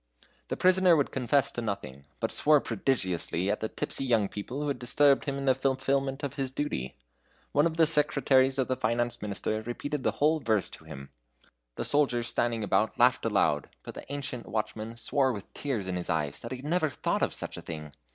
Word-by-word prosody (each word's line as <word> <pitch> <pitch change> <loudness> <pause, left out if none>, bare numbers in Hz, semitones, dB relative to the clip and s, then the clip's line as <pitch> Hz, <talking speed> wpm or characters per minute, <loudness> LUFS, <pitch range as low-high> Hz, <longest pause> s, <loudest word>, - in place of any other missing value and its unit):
The - - -3
prisoner 185 -1 +5
would 145 -3 +1
confess 135 +1 +1
to 120 - -4
nothing, 100 - -5
but 115 - -1
swore 150 0 +4
prodigiously 95 -6 -1
at - - -1
the 110 - -3
tipsy - - -2
young 115 -6 +2
people 120 +7 -5
who - - -2
had 140 - -2
disturbed 140 +3 +3
him 140 -1 -2
in 140 - -4
the 130 - +5
fulfilment 135 +1 0
of 140 - -2
his 135 -2 -2
duty. 130 - -3 0.6
One 145 +3 +4
of 165 -1 -5
the 165 - +6
secretaries 140 -3 +3
of 130 - +1
the 130 - 0
Finance 120 0 -1
Minister 105 +1 -2
repeated 130 +5 -4
the - - 0
whole 155 +2 +2
verse 110 -7 0
to - - -11
him. 70 0 -10 0.6
The - - -3
soldiers 125 -5 +2
standing 115 -2 0
about 110 +4 +1
laughed 125 0 +4
aloud, 100 -9 +1
but - - -8
the - - -10
ancient 140 -4 -4
watchman 110 +1 -3
swore 130 +3 +1
with 105 -5 -8
tears 120 -10 -3
in 90 -1 -2
his 90 - -4
eyes 75 -4 -1
that 115 - -7
he 130 - -3
had 130 - -11
never 160 0 +1
thought - - -1
of - - +2
such - - -3
a - - -7
thing. 75 -2 -7
125 Hz, 210 wpm, -29 LUFS, 110-140 Hz, 0.6 s, the